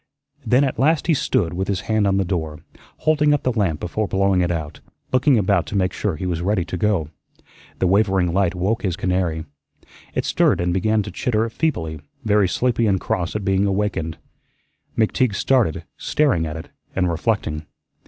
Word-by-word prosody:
Then 125 +3 +3
at 130 -5 -1
last 150 +4 +3
he 170 - +3
stood 90 - 0
with 95 +2 -2
his 95 -2 -1
hand 110 0 +1
on 95 0 +2
the 95 - +1
door, 80 -4 -2 0.4
holding 150 -1 +3
up 145 - -4
the 130 - +1
lamp 95 -10 0
before 105 +4 -2
blowing 95 -1 +2
it 90 - +1
out, 80 -4 -4 0.3
looking 130 +1 +4
about 100 -1 +2
to - - -5
make 95 -2 +1
sure 100 -6 -1
he 90 - -5
was 85 -2 -1
ready 95 -1 0
to 90 - -5
go. 90 -5 0 0.7
The - - 0
wavering 95 -2 +2
light 95 -2 +1
woke 95 +6 0
his 95 -4 -1
canary. 90 -4 -1 0.7
It - - 0
stirred - - +2
and 90 0 0
began 110 +3 +1
to - - -7
chitter 115 -2 0
feebly, 80 - -2 0.2
very 105 -2 +3
sleepy 120 +3 +1
and 95 -2 +2
cross 90 +1 -2
at 105 -2 -2
being 95 +1 +2
awakened. 95 -5 -1 0.8
McTeague 110 0 +2
started, 120 - +1
staring 130 - +1
at 80 +1 -5
it, 80 - -9 0.3
and 90 -1 +2
reflecting. 80 -4 -1
95 Hz, 185 wpm, -21 LUFS, 85-110 Hz, 0.8 s, looking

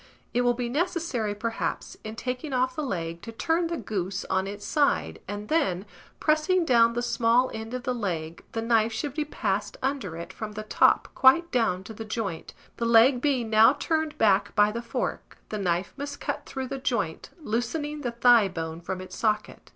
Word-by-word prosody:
It 245 - +2
will 245 0 +2
be 245 0 -2
necessary, 285 - -1
perhaps, 230 +2 -3
in 215 0 -6
taking 250 +4 -4
off 255 0 +1
the - - -2
leg, 170 - -3
to 230 - -8
turn 330 +8 0
the 335 0 -3
goose 195 - -3
on 190 0 +1
its 205 0 -7
side, 280 - +1
and 205 +1 -5
then, 205 - +1 0.3
pressing 325 +4 +2
down 235 -4 +5
the 240 +1 -2
small 240 +1 +2
end 220 +2 -5
of 250 - -5
the 250 - 0
leg, 170 -8 -4
the 225 - -2
knife 225 -1 +3
should 250 +5 -3
be 305 +1 -1
passed 210 -8 -2
under 260 - -2
it 170 - -7
from 215 -1 -6
the 215 +1 -5
top 215 - +3
quite 335 +6 +5
down 220 -7 +1
to 220 - -9
the 225 - -7
joint; 215 -6 -4 0.2
the 235 - -1
leg 235 +2 +6
being 255 -6 0
now 220 +4 +7
turned 315 +1 -1
back 200 -3 +3
by 210 0 +5
the 235 +2 -4
fork, - - -4
the 215 - -3
knife 180 -1 -1
must 285 0 -6
cut - - -4
through 265 -1 -5
the 275 -1 -4
joint, 235 -11 -2
loosening 295 +4 -2
the 250 - -1
thigh 235 -2 +5
bone 165 -2 -5
from 185 +2 -4
its 185 - -9
socket. 215 -2 -1
230 Hz, 195 wpm, -27 LUFS, 205-265 Hz, 0.3 s, now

